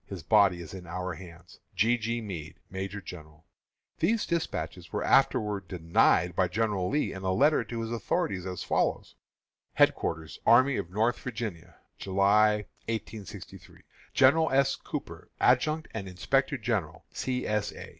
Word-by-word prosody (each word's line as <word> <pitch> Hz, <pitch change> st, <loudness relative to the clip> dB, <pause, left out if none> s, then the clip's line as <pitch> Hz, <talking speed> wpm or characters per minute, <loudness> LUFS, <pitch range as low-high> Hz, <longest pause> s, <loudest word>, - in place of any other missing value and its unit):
His 95 Hz, -5 st, -7 dB
body 100 Hz, -2 st, +4 dB
is 80 Hz, -, -11 dB
in 90 Hz, -2 st, -9 dB
our 90 Hz, +2 st, -4 dB
hands. 85 Hz, +1 st, -13 dB, 0.2 s
G. 110 Hz, +6 st, +3 dB
G. 115 Hz, 0 st, -2 dB
MEADE, 85 Hz, -8 st, -7 dB
Major 95 Hz, +2 st, -5 dB
General. 80 Hz, -3 st, -11 dB, 0.5 s
These 215 Hz, +7 st, +2 dB
despatches 170 Hz, -2 st, -3 dB
were -, -, -2 dB
afterward 105 Hz, -3 st, +2 dB
denied 85 Hz, 0 st, +2 dB
by 95 Hz, -1 st, +2 dB
General 100 Hz, -1 st, -1 dB
Lee 150 Hz, +3 st, 0 dB
in 95 Hz, -, -7 dB
a 95 Hz, -1 st, 0 dB
letter 145 Hz, +10 st, +3 dB
to 115 Hz, -1 st, -5 dB
his 115 Hz, 0 st, -4 dB
authorities, 100 Hz, -4 st, -1 dB
as 90 Hz, -1 st, -5 dB
follows: -, -, 0 dB, 0.6 s
HEADQUARTERS 80 Hz, -1 st, +1 dB
ARMY 130 Hz, +3 st, +5 dB
OF 85 Hz, -, -4 dB
NORTHERN 110 Hz, +6 st, 0 dB
VIRGINIA, 110 Hz, -9 st, -6 dB, 0.2 s
July, 105 Hz, +2 st, +3 dB, 0.2 s
1863. 110 Hz, -2 st, -7 dB, 0.3 s
_General 160 Hz, +4 st, +5 dB
S. 135 Hz, 0 st, +3 dB
Cooper, -, -, -7 dB
Adjutant 155 Hz, +5 st, +2 dB
and 100 Hz, -3 st, -5 dB
Inspector 135 Hz, +10 st, 0 dB
General 105 Hz, -9 st, -3 dB
C. 125 Hz, -1 st, -2 dB
S. 105 Hz, -1 st, -1 dB
A. -, -, -9 dB
105 Hz, 145 wpm, -28 LUFS, 90-120 Hz, 0.6 s, ARMY